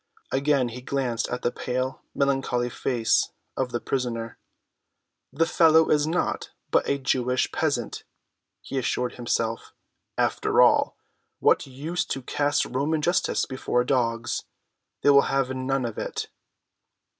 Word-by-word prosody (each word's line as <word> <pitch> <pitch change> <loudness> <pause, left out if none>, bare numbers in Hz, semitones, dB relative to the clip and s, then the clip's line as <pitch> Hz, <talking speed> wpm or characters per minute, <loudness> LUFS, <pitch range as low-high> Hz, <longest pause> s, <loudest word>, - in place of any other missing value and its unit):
Again 135 -2 +2
he 125 +2 -8
glanced 125 -3 -1
at 125 - -4
the 120 - +1
pale, 130 +1 -3
melancholy 135 -3 0
face 120 -3 +1 0.3
of 130 -2 -1
the 120 - -1
prisoner. 120 -4 -3 0.9
"The 160 +5 +2
fellow 160 -1 +5
is 150 0 +3
naught 170 +3 -1 0.2
but - - +2
a 140 - +2
Jewish 125 -2 0
peasant," - - -1 0.6
he 135 - -3
assured 125 0 -1
himself. 115 -1 -2 0.4
"And - - +4
after - - 0
all, - - +5 0.4
what - - +3
use 150 +7 -3
to 135 - -4
cast 145 +2 +1
Roman 150 +4 -1
justice 175 +4 +1
before 125 -1 0
dogs. 120 -2 0 0.6
They 145 - +6
will 140 0 +7
have 135 -1 +1
none 130 0 -1
of 115 -2 -4
it." - - -4
130 Hz, 135 wpm, -25 LUFS, 125-140 Hz, 0.9 s, will